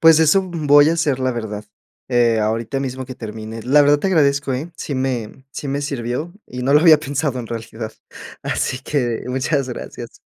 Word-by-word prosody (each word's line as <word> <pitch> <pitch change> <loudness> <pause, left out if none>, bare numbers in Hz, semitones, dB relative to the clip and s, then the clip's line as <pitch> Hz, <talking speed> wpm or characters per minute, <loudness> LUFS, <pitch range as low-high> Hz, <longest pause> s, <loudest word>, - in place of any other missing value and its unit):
Pues 165 -1 +7
eso, 160 +5 +4
voy 150 -5 +4
a 165 - +2
hacer, 145 -6 0
la 130 0 +1
verdad, 110 -3 -5 0.4
eh, 120 -3 +3
ahorita 115 +5 -1
mismo 130 -1 -4
que 130 - -7
termine. 110 0 -7
La 145 +4 +5
verdad 145 0 +4
te 195 - 0
agradezco, 140 -5 +2
¿eh?, 155 +7 -4
sí 140 - -4
me 130 -1 -3
sí 145 - -5
me 140 +1 -1
sirvió 140 +3 -3 0.2
y 125 0 -6
no 140 +3 +2
lo 150 - +7
había 160 -3 +7
pensado 140 -2 -2
en 120 - -5
realidad. 110 -1 -6 0.5
Así 130 - -1
que, 125 -5 -1
muchas 135 +1 0
gracias. 120 - -8
135 Hz, 190 wpm, -20 LUFS, 120-145 Hz, 0.5 s, Pues